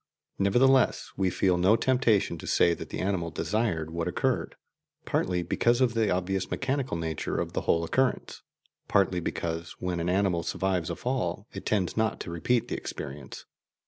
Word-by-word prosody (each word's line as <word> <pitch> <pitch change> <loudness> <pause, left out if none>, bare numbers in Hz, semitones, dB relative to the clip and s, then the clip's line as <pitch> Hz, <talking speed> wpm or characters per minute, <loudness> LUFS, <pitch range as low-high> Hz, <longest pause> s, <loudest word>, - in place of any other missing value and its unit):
Nevertheless, 130 +7 +3
we 95 -1 +1
feel 90 0 +1
no 95 +5 +5
temptation 115 -9 +2
to - - -8
say 85 - +4
that - - -7
the - - -5
animal 95 -3 -1
desired 85 -3 -1
what 85 0 -2
occurred, - - -1 0.5
partly 90 -1 0
because 120 +7 +2
of 125 -3 +3
the 110 -3 +1
obviously 95 +1 -1
mechanical 130 -6 -1
nature 80 -2 -3
of - - -2
the - - -1
whole 85 - +2
occurrence, 130 +10 0 0.5
partly 95 -2 +2
because, 85 -1 -3
when 90 -1 -2
an 85 +1 -1
animal 95 -2 +2
survives 90 -1 -1
a - - -2
fall, 100 -7 -2
it - - -7
tends 95 -6 0
not 110 -1 0
to 85 - -6
repeat 115 +8 0
the - - -3
experience. 70 -1 -7
95 Hz, 170 wpm, -28 LUFS, 85-115 Hz, 0.5 s, no